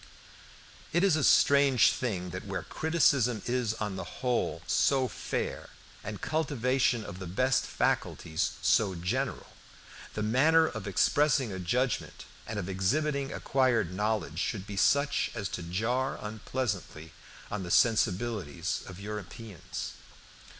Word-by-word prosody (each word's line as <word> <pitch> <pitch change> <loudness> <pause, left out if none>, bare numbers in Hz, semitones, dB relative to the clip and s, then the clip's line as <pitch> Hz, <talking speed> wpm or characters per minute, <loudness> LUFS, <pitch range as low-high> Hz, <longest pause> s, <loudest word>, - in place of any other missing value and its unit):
It 175 +3 +3
is 195 -5 +4
a 155 - 0
strange 140 -5 +5
thing 95 -8 -3
that 95 +3 -6
where 95 -3 -3
criticism 140 - +2
is 120 -3 0
on 105 -3 -4
the - - -4
whole 125 -2 -2
so 135 -2 +2
fair, - - -4 0.3
and 105 -1 -6
cultivation 130 -6 +1
of 90 - -8
the 95 - -6
best 130 +8 +1
faculties 80 - -1
so 100 -4 +3
general, 90 +2 -2 0.6
the 105 - -2
manner 155 +9 +4
of 110 -9 -5
expressing 135 +5 +2
a 95 - -5
judgment 125 +8 -1 0.2
and - - -4
of - - -3
exhibiting 135 +9 0
acquired 120 -9 +1
knowledge 105 -6 -1
should 95 0 -2
be 105 -1 -7
such 140 +8 +2
as 105 -4 -2
to - - -5
jar 110 +10 -1
unpleasantly 105 -7 -4 0.4
on 105 - -2
the 90 - -6
sensibilities 110 - +1
of 90 -1 -9
Europeans. 105 - -7
110 Hz, 130 wpm, -29 LUFS, 95-130 Hz, 0.6 s, strange